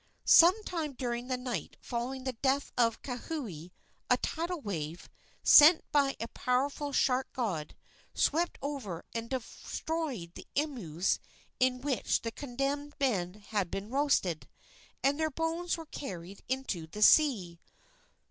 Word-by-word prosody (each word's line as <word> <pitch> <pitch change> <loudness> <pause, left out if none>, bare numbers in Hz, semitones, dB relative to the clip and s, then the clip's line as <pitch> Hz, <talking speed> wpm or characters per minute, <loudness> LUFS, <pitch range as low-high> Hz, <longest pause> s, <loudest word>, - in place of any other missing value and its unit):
Some 370 +6 +7
time 320 -7 -3
during 245 -1 -3
the 255 -1 -1
night 245 - -4
following 255 +2 -4
the 260 -1 -2
death 270 +4 0
of 230 -2 +1
Kauhi 245 - -5 0.4
a - - +5
tidal 340 +1 -3
wave, 170 - -5 0.4
sent 315 +3 +9
by 280 -2 +3
a 230 - -3
powerful 280 +3 -1
shark 260 -1 +1
god, 190 -12 -3 0.4
swept 335 +4 +1
over 260 - -4
and 230 0 -4
destroyed 260 - -4
the - - -11
imus 215 - 0 0.4
in 255 0 +2
which 270 -2 0
the 230 - -2
condemned 285 +3 -3
men 195 -10 0
had 205 -5 0
been 200 +5 -5
roasted, 270 - +1 0.5
and 280 +2 +2
their 315 0 +1
bones 325 +4 -1
were 325 - -8
carried 190 - -7
into 255 -11 -2
the 210 +6 -1
sea. 210 - +5
255 Hz, 135 wpm, -31 LUFS, 210-290 Hz, 0.5 s, sent